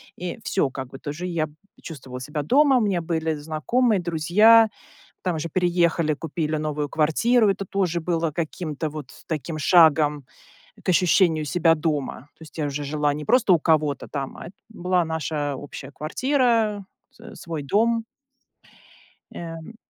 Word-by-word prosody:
и 180 +5 -6
всё, 145 -10 0
как 130 -1 -6
бы 135 - -10
тоже 155 +6 -5
я 165 -3 -1 0.4
чувствовала 135 -6 -8
себя 150 +4 -4
дома, 270 - +4
у - - +2
меня 195 -5 0
были 160 -1 -1
знакомые, 185 +10 0
друзья, 195 +7 +5 0.5
там 180 -3 -1
уже 160 +2 -4
переехали, 170 -2 +1
купили 155 +1 -3
новую 150 -1 -2
квартиру. 210 - +2
Это 195 0 -2
тоже 180 -3 -1
было 165 -1 -1
каким-то 155 -1 -4
вот 150 -3 -8 0.2
таким 160 0 -4
шагом 150 -3 +4 0.6
к - - -12
ощущению 175 -3 +3
себя 165 +2 +3
дома. 150 -5 -2
То - - -17
есть 160 +1 -13
я 150 - 0
уже 145 +1 -4
жила 145 0 0
не 150 0 -6
просто 245 - +3
у 170 - +4
кого-то 155 -3 +1
там, 140 -2 -5
а - - -9
это 185 - -11
была 180 -4 0
наша 155 -3 -2
общая 140 0 -9
квартира, 225 - 0 0.3
с - - -13
свой 165 -3 -5
дом. 225 +9 +1 1.3
Э 165 +5 -8
160 Hz, 155 wpm, -23 LUFS, 150-185 Hz, 1.3 s, друзья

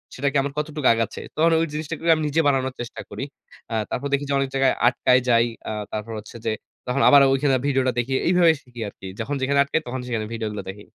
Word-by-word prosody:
সেটাকে 140 +2 0
আমার 140 0 -4
কতটুকু 150 -2 -1
আগাচ্ছে?" 115 0 -2
তখন 165 +2 +3
ওই - - +2
জিনিসটাকে 155 +1 -5
আমি 155 - -3
নিজে 150 +3 +2
বানানোর 130 -2 +1
চেষ্টা 120 - -7
করি। - - -5 0.5
আ - - 0
তারপর 140 - -3
দেখি 140 +1 +1
যে, - - +1
অনেক 135 -1 -1
জায়গায় 135 -1 +3
আটকায় 125 0 +3
যাই। 115 -1 +5 0.2
আ - - -2 0.2
তারপর 110 +1 -5
হচ্ছে 105 - -13
যে, 110 - +1 0.4
তখন 125 +2 0
আবার 140 -1 +8
ঐখানে 135 0 +2
ভিডিওটা 130 -2 +2
দেখি। 125 +3 -1
এইভাবে 175 -1 +5
শিখি 120 -2 -11
আরকি। 95 -1 -10
যখন 135 +6 -2
যেখানে 140 +2 +2
আটকাই, 140 +3 -1
তখন 130 +1 -4
সেখানে 115 -3 -2
ভিডিওগুলা 105 -3 -4
দেখি। 105 +2 -9
130 Hz, 215 wpm, -23 LUFS, 115-145 Hz, 0.5 s, আবার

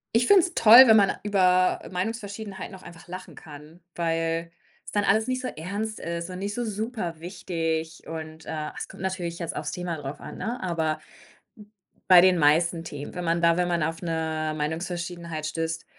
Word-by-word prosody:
Ich 240 - +4
find's 365 -1 +5
toll, 230 +4 +10
wenn 220 -1 +7
man 200 -2 +4
über 185 -3 +3
Meinungsverschiedenheiten 205 0 -5
auch 185 - -13
einfach 170 -1 -13
lachen 185 +1 -9
kann, 150 +2 -13 0.2
weil's 165 0 -1 0.4
dann 205 -1 +1
alles 220 +4 +2
nicht 255 0 -1
so 255 - -3
ernst 205 +7 -5
ist 170 +1 -4
und 180 - -6
nicht 200 +1 -3
so 245 - -2
superwichtig 170 -6 -4
und, 160 0 -7
äh, 155 -1 -4
es - - -5
kommt - - -11
natürlich 180 -3 -3
jetzt 170 -2 -5
auf's 150 0 -3
Thema 175 -2 -4
drauf 145 -1 -7
an, - - -9
ne? 240 +2 -3
Aber 160 -3 -1 1.1
bei 180 -2 +9
den 185 0 +5
meisten 165 +2 +3
Themen, 145 -3 -7
wenn 180 -1 -4
man 170 +1 +1
da 170 0 +4
wenn 180 - +1
man 170 -2 +1
auf 165 +1 -3
'ne 160 -2 -2
Meinungsverschiedenheit 170 +1 -4
stößt, 160 +1 -3
170 Hz, 175 wpm, -26 LUFS, 160-195 Hz, 1.1 s, toll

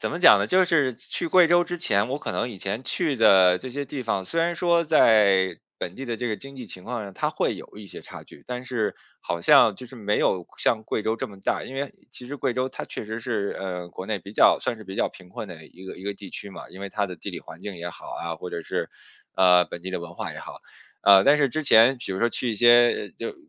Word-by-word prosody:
怎 - - -2
么 170 - -4
讲 - - +8
呢？ - - 0
就 185 0 +4
是 150 -8 +1
去 130 +7 -4
贵 180 0 +6
州 175 0 +4
之 175 +1 -5
前， 105 -6 +1
我 135 - -3
可 - - -5
能 120 - -1
以 115 - -9
前 100 +6 -4
去 160 -6 0
的 95 -5 +6
这 130 - -8
些 140 +2 -4
地 135 0 -6
方， 100 -5 -2
虽 165 - -1
然 170 +1 +1
说 170 -1 +2
在 100 - +4 0.2
本 90 - -5
地 135 - -7
的 120 -1 -3
这 125 - -3
个 110 - -1
经 135 0 -11
济 125 -3 -8
情 90 - -8
况 120 -1 -4
上， 100 -2 -9
它 - - -1
会 - - -1
有 - - -13
一 105 -1 -10
些 - - -10
差 - - -11
距， 70 - -17
但 125 0 -5
是 120 -5 -2 0.3
好 85 - -4
像 105 +3 +6
就 125 - -10
是 130 - -13
没 105 -2 -1
有 90 -2 0
像 110 - +1
贵 110 - -2
州 110 - 0
这 - - -4
么 100 -2 -14
大。 - - -1
因 130 - -9
为 140 +1 -4 0.2
其 125 - -10
实 145 +3 -6
贵 130 -3 -1
州 130 +1 -1
它 - - -6
确 - - -7
实 110 +2 -6
是， 110 -4 -2
呃， 90 -2 -5
国 95 - -8
内 105 -1 -2
比 100 +1 -12
较 - - +5
算 120 - -3
是 110 - -11
比 95 +1 -8
较 - - +1
贫 90 -1 -15
困 105 - -7
的 80 -3 -11
一 95 +2 -15
个 95 - -8
一 - - -11
个 100 +1 -3
地 100 -1 -11
区 100 - -8
嘛， - - -11
因 95 - -12
为 100 - -5
它 100 +1 -2
的 90 -2 -8
地 - - -8
理 - - -6
环 - - -13
境 100 -3 -6
也 85 +1 -6
好 80 - -13
啊， 85 -1 -5
或 90 - -7
者 85 - -5
是， - - -3 0.5
呃， 90 -2 +5
本 85 - -9
地 95 - -5
的 95 - -3
文 85 0 -9
化 - - -5
也 - - -9
好。 - - -10 0.4
呃， 100 -1 +7
但 145 +2 +6
是 140 -2 +2
之 155 +5 -2
前 125 0 +6
比 120 - -6
如 95 - -4
说 115 - +2
去 125 - -2
一 - - -2
些 120 +2 +5
就 445 - -7
110 Hz, 305 characters per minute, -24 LUFS, 95-130 Hz, 0.5 s, 讲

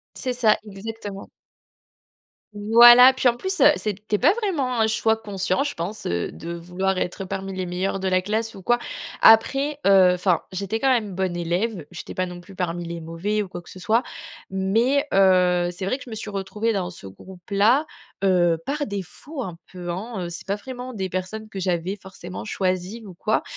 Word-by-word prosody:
C'est 255 -1 -2
ça, 225 -4 +3
exactement. 205 0 -8 1.2
Voilà, 240 +5 +8
puis 260 -1 +3
en 240 - -2
plus, 380 +4 -3
heu, 295 - +8
c'était 210 0 -2
pas 300 - +4
vraiment 315 - -1
un - - +5
choix 220 0 +2
conscient, 195 -2 -1
je 285 - -3
pense, 185 +6 -5
heu, 85 0 -2
de 170 +1 -7
vouloir 180 +3 -2
être 185 +2 -3
parmi 195 +1 -5
les 185 -1 -3
meilleurs 185 +2 -2
de 190 - 0
la 185 0 +2
classe 220 +3 -2
ou 195 - -10
quoi. 240 +6 +2 0.4
Après, 275 +6 +5
heu, 190 -2 +7
enfin, 180 -1 +1
j'étais 200 +4 -3
quand 270 - +3
même 215 -7 0
bonne 185 -2 -1
élève. 175 +1 -2
J'étais 175 - -8
pas 185 - -1
non 180 -1 -8
plus 195 +2 -14
parmi 175 -2 -3
les 170 0 -5
mauvais 165 +6 -2
ou 205 - -4
quoi 175 -1 -8
que - - -16
ce 185 - -11
soit. 220 +7 +2 0.5
Mais, 225 +10 +1
heu, 180 -2 +4
c'est 185 +2 -6
vrai 225 +7 0
que - - -11
je 245 - -12
me 220 - -6
suis 215 - -6
retrouvée 210 +3 -2
dans 180 -3 -2
ce 165 - -11
groupe-là 200 - 0 0.4
heu, 175 -3 +3
par 290 +1 -2
défaut 205 - -6
un 180 -8 -6
peu, 175 -1 -7
hein, 190 +1 -4
heu. - - -5
C'est 170 - -8
pas 200 +1 -1
vraiment 255 +3 -8
des 190 -3 -3
personnes 185 +4 -5
que 205 - -10
j'avais 180 +1 -1
forcément 185 -2 -9
choisies 190 +2 -2
ou 190 - -10
quoi, 215 +5 0
195 Hz, 200 wpm, -23 LUFS, 180-225 Hz, 1.2 s, Voilà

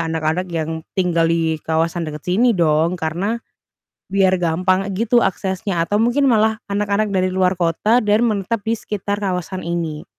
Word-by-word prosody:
anak-anak 160 +3 -1
yang 160 -1 -3 0.2
tinggal 170 -3 +2
di 165 -1 +1
kawasan 165 +2 0
dekat 150 -1 -7
sini 215 +8 +3
dong 165 -1 +2
karena 175 +8 -2 0.8
biar 190 -1 +3
gampang 180 +3 +1
gitu 230 +4 +2
aksesnya 190 -2 -2
atau 205 +5 0
mungkin 240 +5 +2
malah 220 -1 +2
anak-anak 205 +1 0
dari 185 -1 0
luar 185 0 +1
kota 175 +7 +2
dan 210 +2 +3
menetap 215 -1 -1
di 225 +2 -1
sekitar 205 -1 -3
kawasan 185 -2 -3
ini. 165 -3 -3
185 Hz, 155 wpm, -19 LUFS, 165-210 Hz, 0.8 s, sini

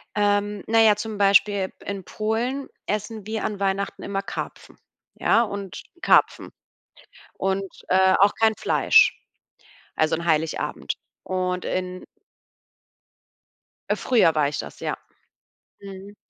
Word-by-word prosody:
Ähm, 205 -1 +1
na 225 0 +3
ja, 215 -2 +6
zum 215 0 -5
Beispiel 200 -1 +3
in 200 -2 -5
Polen 235 +8 -2 0.2
essen 210 0 -4
wir 220 0 -3
an 205 -2 -3
Weihnachten 195 0 -2
immer 195 -1 -2
Karpfen, - - -7 0.4
ja 230 - +3
und 200 -4 -5 0.2
Karpfen. - - +3 0.8
Und, 195 +1 -1 0.3
äh, 190 0 +5
auch 200 +1 +6
kein 220 -1 +4
Fleisch 480 +3 +4 0.7
also, 155 +1 +2
an 170 - -6
Heiligabend. 160 -1 -1 0.3
Und 185 -1 -2
in 185 0 -3 1.9
Früher 225 -10 +3
war 150 -2 +3
ich 145 - -4
das, - - -7
ja. - - -3 0.8
Mhm. 195 +1 -10
200 Hz, 120 wpm, -24 LUFS, 185-215 Hz, 1.9 s, ja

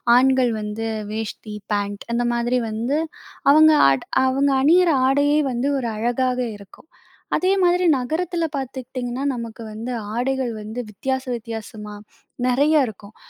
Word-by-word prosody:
ஆண்கள் 260 -1 +4
வந்து 210 +2 -4 0.3
வேஷ்டி, 215 -1 -5 0.2
பேண்ட் 205 0 -2
அந்த 240 +1 +1
மாதிரி 240 +1 +1
வந்து 235 +7 -1 0.5
அவங்க 310 +1 +7 0.2
ஆட் 135 -1 0 0.2
அவங்க 275 +2 +2
அணியிற 345 +5 +5 0.2
ஆடையே 290 +2 +3
வந்து 250 +3 -1
ஒரு 240 -3 -2
அழகாக 250 +3 0 0.2
இருக்கும். 200 +10 -17 0.5
அதே 370 +1 +2
மாதிரி 355 +1 +3
நகரத்துல 330 +6 -1
பாத்துக்கிட்டீங்கன்னா, 255 -1 -5
நமக்கு 230 -1 -7
வந்து 225 +4 -5 0.2
ஆடைகள் 255 -1 -1
வந்து 215 +3 -6
வித்தியாச 265 +5 -3
வித்தியாசமா 220 -2 -8 0.5
நெறையா 285 +4 +4
இருக்கும். 205 0 -13
250 Hz, 125 wpm, -22 LUFS, 225-275 Hz, 0.5 s, அவங்க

